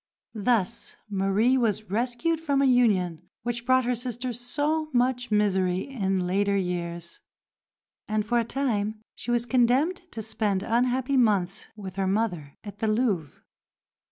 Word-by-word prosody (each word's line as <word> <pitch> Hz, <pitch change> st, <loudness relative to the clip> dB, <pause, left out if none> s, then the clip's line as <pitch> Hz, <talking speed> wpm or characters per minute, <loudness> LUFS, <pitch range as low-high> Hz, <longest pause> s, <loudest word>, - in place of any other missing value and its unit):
Thus 220 Hz, -2 st, 0 dB, 0.2 s
Marie 200 Hz, +6 st, +2 dB
was 215 Hz, -4 st, -1 dB
rescued 245 Hz, +9 st, 0 dB
from 285 Hz, -4 st, 0 dB
a 275 Hz, -, +4 dB
union 205 Hz, -10 st, +2 dB
which 240 Hz, 0 st, -3 dB
brought 255 Hz, -1 st, +4 dB
her 250 Hz, -, +1 dB
sister 245 Hz, +1 st, -3 dB
so 295 Hz, +6 st, -1 dB
much 245 Hz, 0 st, +1 dB
misery 190 Hz, -3 st, +2 dB
in 195 Hz, -8 st, -1 dB
later 200 Hz, +2 st, +1 dB
years, 170 Hz, -2 st, -4 dB, 0.9 s
and 215 Hz, -1 st, 0 dB
for 240 Hz, +2 st, +2 dB
a -, -, +2 dB
time 220 Hz, -4 st, -1 dB
she -, -, -9 dB
was 240 Hz, 0 st, +2 dB
condemned 260 Hz, +8 st, +3 dB
to 220 Hz, -, -5 dB
spend 205 Hz, -3 st, -1 dB
unhappy 250 Hz, +4 st, +1 dB
months 205 Hz, -5 st, +1 dB
with 195 Hz, -3 st, -8 dB
her 195 Hz, -1 st, +1 dB
mother 185 Hz, -8 st, -1 dB
at 205 Hz, -1 st, -9 dB
the 220 Hz, -, 0 dB
Louvre. 215 Hz, -, 0 dB
225 Hz, 145 wpm, -26 LUFS, 195-250 Hz, 0.9 s, a